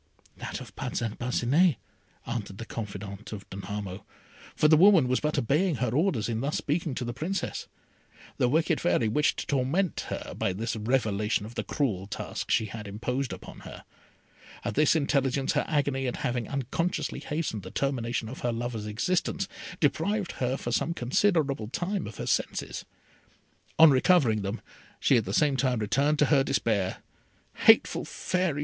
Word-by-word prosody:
"That - - -5
of - - -11
Parcin 115 -3 -3
Parcinet," 130 +7 +3 0.5
answered 110 -5 -4
the 115 - -6
confidante 100 -1 -6
of 100 - -11
Danamo, 100 -1 -5 0.5
for 150 - +4
the 155 - +7
woman 175 -4 +6
was 130 0 +2
but 150 0 -1
obeying 150 +7 +2
her 125 -3 -1
orders 140 - +1
in 115 -1 -2
thus 145 +3 -1
speaking 150 -2 -1
to 125 - -3
the 120 - -3
Princess. 165 +10 -3 0.7
The 125 - +3
wicked 160 +5 +2
Fairy 145 -9 +2
wished 145 +8 +2
to - - -3
torment 145 +7 0
her - - -5
by 95 - -1
this 110 +4 -3
revelation 105 -3 0
of 115 - -9
the - - -3
cruel 100 -10 -1
task 100 - -5
she 110 - +3
had 105 +1 -7
imposed 125 +6 -2
upon - - -9
her. - - -11 0.8
At - - -1
this 150 +2 +4
intelligence 140 -3 +1
her - - +1
agony 140 -3 0
at 125 - -2
having 120 -2 -1
unconsciously 140 +6 -2
hastened 150 -9 -3
the 95 - -9
termination 120 -1 -1
of 125 - -7
her 120 - 0
lover's 115 -2 -3
existence, 180 - 0 0.3
deprived 175 +7 +1
her 130 +1 -1
for 120 - -4
some 165 +7 0
considerable 140 - +1
time 180 - -2
of 105 - -9
her - - -4
senses. - - -1 0.9
On 160 -2 +9
recovering 130 - +4
them, 100 +4 -4 0.4
she 130 - +4
at 110 - 0
the - - -3
same 145 -3 +3
time 130 -2 +1
returned 140 +8 +1
to 150 - +4
her 135 -2 +5
despair. 105 -8 0 0.5
"Hateful - - +5
Fairy!" 180 -5 -1
130 Hz, 170 wpm, -28 LUFS, 110-150 Hz, 0.9 s, On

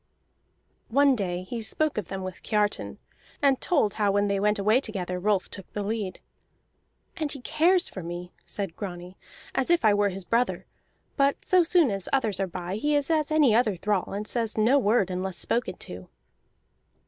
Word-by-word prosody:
One 275 +2 +4
day 180 -4 -2
he 230 +5 -5
spoke 310 +7 0
of 210 -5 -3
them 190 0 -5
with 185 -1 -7
Kiartan, 210 -1 -1 0.4
and 275 -3 +2
told 275 - +2
how 205 -2 +1
when 205 +1 +2
they 200 0 +1
went 210 +2 +2
away 215 +5 +3
together 185 -6 -3
Rolf 200 0 +1
took 195 - -9
the 205 - -2
lead. 205 -3 -3 1.0
"And 305 -3 -2
he 280 - -4
cares 330 +7 +2
for 190 - -7
me," 175 +1 -6
said 195 -5 -5
Grani, 180 -2 -7 0.4
"as 265 - 0
if 345 -8 +3
I 210 - +6
were 205 0 +2
his 190 -1 -6
brother; 235 +5 0 0.5
but 280 0 +1
so 370 -1 +5
soon 335 - +3
as 195 -2 -3
others 225 -8 +1
are 195 - 0
by 180 +2 -5
he 295 +6 +1
is 290 +2 +1
as 310 -1 +1
any 300 -7 +4
other 220 -3 +3
thrall, 195 +1 -1
and 205 +2 -4
says 230 -3 -2
no 235 +6 +4
word 210 -5 +2
unless 185 0 -3
spoken 230 -6 -1
to." 90 0 -8
210 Hz, 185 wpm, -26 LUFS, 190-270 Hz, 1.0 s, I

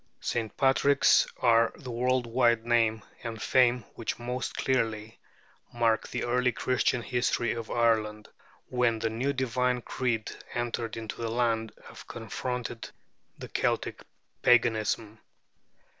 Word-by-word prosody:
St. 115 -2 -3
Patrick's 140 0 +4
are 115 -1 +4
the 130 -5 -8
world 125 +1 +1
wide 115 -1 +2
name 115 -2 +2 0.2
and 115 -2 -5
fame 125 0 +3
which 115 - -4
most 125 +2 -4
clearly 115 -4 -1 0.5
mark 115 -2 +1
the - - -3
early 125 +1 +2
Christian 125 -1 0
history 120 -1 0
of 115 -1 -6
Ireland, 110 -2 +1 0.4
when 125 -2 +1
the 110 0 -1
new 125 +5 0
divine 125 -2 0
creed 120 -4 -2 0.2
entered 120 -2 -2
into 110 0 -6
the 115 - -2
land 115 -1 0
and - - -12
confronted 120 +1 -5 0.5
the - - -8
Celtic - - -1 0.4
paganism. 110 -2 +2
120 Hz, 125 wpm, -28 LUFS, 115-125 Hz, 0.5 s, Patrick's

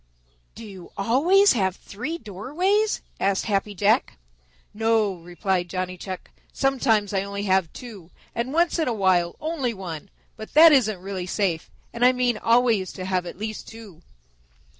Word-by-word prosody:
"Do 225 - -9
you 190 -4 -11
always 325 - +4
have 190 -6 0
three 255 +14 -6
doorways?" 340 - -1 0.2
asked 195 0 +1
Happy 205 -1 -1
Jack. 210 +6 +2 0.6
"No," 220 -2 +1
replied 175 +1 -2
Johnny 185 -1 -3
Chuck. 185 +1 -8 0.2
"Sometimes 230 -7 +1
I 195 - +2
have 195 - -3
only 195 -3 0
two 210 -9 -11 0.2
and 235 +3 -3
once 340 +3 +2
in 320 - +1
a 245 - +1
while 185 -4 +2
only 295 -7 -2
one. 180 -2 -7 0.3
But 220 - -10
that 325 +1 +9
isn't 220 -9 +3
really 190 -2 -5
safe, 180 -4 -1 0.2
and 235 - -2
I 250 +1 +6
mean 245 -3 0
always 230 -5 +2
to 185 - -6
have 185 -1 -1
at - - -8
least 215 +1 -5
two." 215 -7 -12
210 Hz, 160 wpm, -24 LUFS, 190-250 Hz, 0.6 s, that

